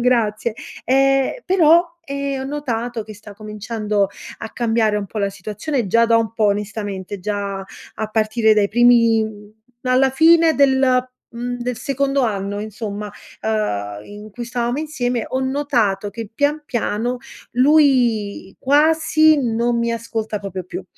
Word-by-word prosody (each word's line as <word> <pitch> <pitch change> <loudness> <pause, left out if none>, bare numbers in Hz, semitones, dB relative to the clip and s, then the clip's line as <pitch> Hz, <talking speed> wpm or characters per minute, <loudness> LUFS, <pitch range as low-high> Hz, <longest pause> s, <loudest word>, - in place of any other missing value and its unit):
grazie, 230 -2 +1 0.3
ehm, 270 +1 +3
però, 345 -2 +5 0.2
ehm, 280 -2 -3
ho - - -4
notato 245 -5 -3
che 215 0 -10
sta 205 -1 -13
cominciando 210 -1 -2 0.3
a 220 - -7
cambiare 225 -3 +1
un 205 - -2
po' 215 - -6
la 200 -1 +1
situazione, 215 +6 -3
già 230 +4 +3
da 230 0 +4
un 225 -1 0
po', 225 -1 0
onestamente, 205 -1 -3
già 200 -1 -3 0.3
a 220 - -3
partire 220 0 +2
dai 205 -1 +2
primi 230 -1 +4
mhmm, 210 -1 -9 0.3
alla 255 +1 +3
fine 325 +3 +5
del 270 -2 +4
mhmm, 255 -1 +2 0.5
del 245 -1 -3
secondo 275 0 0
anno, 205 -3 -2
insomma, 210 -1 -5 0.3
ehm, 105 - -2
in 210 +1 -11
cui 240 +3 -6
stavamo 240 +2 -2
insieme, 250 -7 -2
ho 260 - -2
notato 245 -8 0
che, 225 0 -7
pian 295 +3 0
piano, 240 0 -2 0.3
lui 245 -8 +2
quasi 310 +2 +4
non 235 0 0
mi 235 0 0
ascolta 225 -2 -3
proprio 190 -2 -6
più. 355 - -7
230 Hz, 145 wpm, -20 LUFS, 210-265 Hz, 0.5 s, però